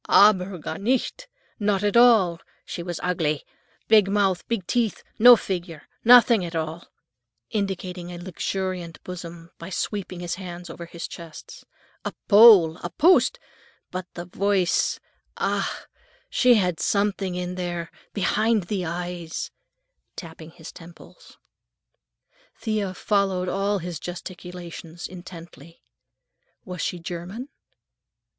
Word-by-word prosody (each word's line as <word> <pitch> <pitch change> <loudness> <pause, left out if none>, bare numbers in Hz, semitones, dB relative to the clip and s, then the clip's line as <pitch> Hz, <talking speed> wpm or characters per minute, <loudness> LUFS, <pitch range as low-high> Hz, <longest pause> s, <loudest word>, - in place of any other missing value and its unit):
"Aber 195 -2 +5
gar 160 0 -6
nicht! 260 - -1 0.3
Not 205 -2 +1
at 205 +1 +1
all. 220 -8 +5 0.3
She - - -5
was 175 -1 -5
ugly; 160 -5 0 0.4
big 215 -3 +6
mouth, 195 -3 +1
big 225 -6 -2
teeth, 230 -2 -1 0.2
no 245 +2 +10
figure, 175 -7 -5 0.2
nothing 235 -3 +7
at 170 -1 -5
all," 160 +1 -4 0.6
indicating 185 -3 -3
a 175 - -7
luxuriant 185 -1 -4
bosom 170 -2 -8
by 170 - -8
sweeping 190 -1 -4
his 175 0 -3
hands 175 -1 -8
over 170 - -9
his 170 0 -7
chest. 180 - -11 0.4
"A - - -4
pole, 200 -7 +8
a 175 - -6
post! 275 - +4 0.5
But 185 0 -4
for 175 - -5
the - - -13
voice—ach! 195 -3 -1 0.5
She 250 -1 +5
have 180 -6 +1
something 200 -2 0
in 180 0 -3
there, 175 -2 -4 0.2
behind 215 +2 +1
the 185 +1 -3
eyes," 175 -1 -5 0.6
tapping 160 -2 -9
his 160 0 -11
temples. 175 - -15 1.2
Thea 210 -4 -2
followed 195 -3 0
all 200 +2 0
his 175 -3 -5
gesticulations 175 -1 -8
intently. 170 -3 -12 0.8
"Was 180 -2 -6
she 180 - -2
German?" 175 - -7
180 Hz, 120 wpm, -24 LUFS, 170-205 Hz, 1.2 s, no